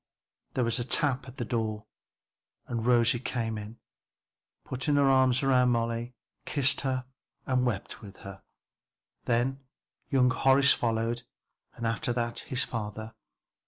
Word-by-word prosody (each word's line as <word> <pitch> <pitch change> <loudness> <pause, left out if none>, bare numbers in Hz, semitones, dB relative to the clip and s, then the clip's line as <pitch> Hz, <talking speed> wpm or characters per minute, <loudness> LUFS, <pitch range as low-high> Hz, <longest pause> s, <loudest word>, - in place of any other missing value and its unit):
There 125 - +2
was 115 +1 0
a - - 0
tap 135 +1 +1
at 130 +1 -11
the 120 - -3
door 110 -2 -2 0.8
and 115 -1 -3
Rosie 120 -1 +4
came 115 -3 -2
in, 105 +2 -7 0.9
put 130 0 -4
her 145 -2 +3
arms 130 -1 +4
round 125 -2 +4
Molly, 115 +1 -1 0.3
kissed 140 -1 +1
her 130 -2 -1 0.4
and 130 -1 +1
wept 105 -6 -4
with 100 -2 -11
her. 95 -1 -9 0.8
Then 125 +3 +1 0.5
young 125 -2 +4
Horace 135 +2 +5
followed 115 0 -1 0.5
and 115 - -5
after 115 +4 -1
that 120 -1 -2
his 130 0 -2
father. 110 0 -5
120 Hz, 135 wpm, -29 LUFS, 115-130 Hz, 0.9 s, Horace